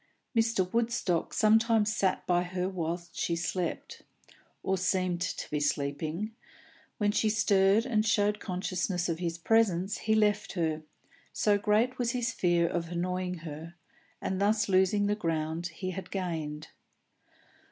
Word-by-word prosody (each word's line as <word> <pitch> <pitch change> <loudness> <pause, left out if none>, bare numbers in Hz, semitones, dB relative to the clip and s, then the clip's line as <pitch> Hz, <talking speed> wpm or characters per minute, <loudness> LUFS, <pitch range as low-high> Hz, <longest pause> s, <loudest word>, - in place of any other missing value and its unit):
Mr. 225 -5 +2
Woodstock 230 -7 0
sometimes 220 0 +3
sat 190 -2 0
by 175 -1 +2
her 180 0 -2
whilst 170 -2 -4
she 170 - 0
slept, 170 +1 -3 0.6
or 190 - +1
seemed 185 -1 0
to 185 - -3
be 150 - 0
sleeping; 150 +7 -1 0.7
when 205 -1 +2
she 215 +1 +2
stirred 210 0 +3
and 220 -5 +1
showed 210 -1 +2
consciousness 180 -1 -2
of 165 -1 -2
his 170 -2 -2
presence, 195 0 +2
he 220 0 +1
left 210 -1 +2
her, 160 -4 -1 0.5
so 210 -1 +2
great 225 +5 +1
was 240 0 0
his 250 0 0
fear 175 -1 +2
of 170 -1 -2
annoying 180 +1 -2
her, 160 +2 -8 0.4
and 190 0 -2
thus 210 +1 +2
losing 190 +2 +3
the 205 - +2
ground 165 -3 -2
he 185 +3 -5
had 185 0 -7
gained. 160 -5 -4
185 Hz, 140 wpm, -30 LUFS, 170-210 Hz, 0.7 s, sometimes